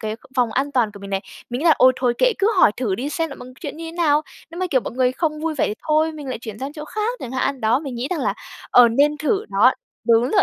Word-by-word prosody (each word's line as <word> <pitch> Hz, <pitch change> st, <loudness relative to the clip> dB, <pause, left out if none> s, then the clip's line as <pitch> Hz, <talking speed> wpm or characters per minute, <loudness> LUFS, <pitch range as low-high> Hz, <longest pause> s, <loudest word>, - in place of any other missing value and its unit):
cái 215 Hz, 0 st, -4 dB, 0.2 s
vòng 240 Hz, -3 st, +2 dB
an 280 Hz, +4 st, -1 dB
toàn 235 Hz, -5 st, +2 dB
của 200 Hz, -, -11 dB
mình 200 Hz, 0 st, -8 dB
này. 195 Hz, 0 st, 0 dB, 0.3 s
Mình 245 Hz, -, -2 dB
nghĩ -, -, -3 dB
là: 320 Hz, -, +6 dB
"Ôi 255 Hz, 0 st, +7 dB
thôi 245 Hz, -2 st, +1 dB
kệ, -, -, +4 dB
cứ 400 Hz, +3 st, +3 dB
hỏi 210 Hz, -, +6 dB
thử 220 Hz, -7 st, -1 dB
đi 265 Hz, +8 st, -3 dB
xem 325 Hz, +1 st, -2 dB
là -, -, -6 dB
mọi 250 Hz, -, -10 dB
chuyện 295 Hz, -3 st, -6 dB
như 330 Hz, -, -7 dB
thế 325 Hz, -, -7 dB
nào." 310 Hz, -3 st, +2 dB, 0.3 s
Nếu 340 Hz, +2 st, -7 dB
mà, 370 Hz, -, +1 dB
kiểu, 260 Hz, -3 st, +3 dB
mọi -, -, -6 dB
người 255 Hz, 0 st, +1 dB
không 305 Hz, +1 st, -2 dB
vui 320 Hz, -1 st, -2 dB
vẻ 275 Hz, -, +1 dB
thì 210 Hz, -, -2 dB
thôi 310 Hz, +1 st, +3 dB
mình 295 Hz, -3 st, -8 dB
lại 255 Hz, -, -3 dB
chuyển 220 Hz, -2 st, -8 dB
sang 275 Hz, +2 st, -5 dB
chỗ 300 Hz, -1 st, -7 dB
khác 435 Hz, +8 st, -3 dB
chẳng 250 Hz, -, -6 dB
hạn. 260 Hz, +1 st, -1 dB
Đó, 225 Hz, +4 st, +3 dB
mình 275 Hz, -5 st, -6 dB
nghĩ 245 Hz, +3 st, -3 dB
rằng 335 Hz, -5 st, -1 dB
là, 205 Hz, -5 st, 0 dB, 0.4 s
ờ, 245 Hz, -1 st, +7 dB
nên 285 Hz, +6 st, +2 dB
thử 390 Hz, +8 st, 0 dB
đó -, -, +5 dB, 0.4 s
đúng 230 Hz, 0 st, +5 dB
rồi. 395 Hz, -, +4 dB
275 Hz, 305 wpm, -21 LUFS, 240-320 Hz, 0.4 s, Ôi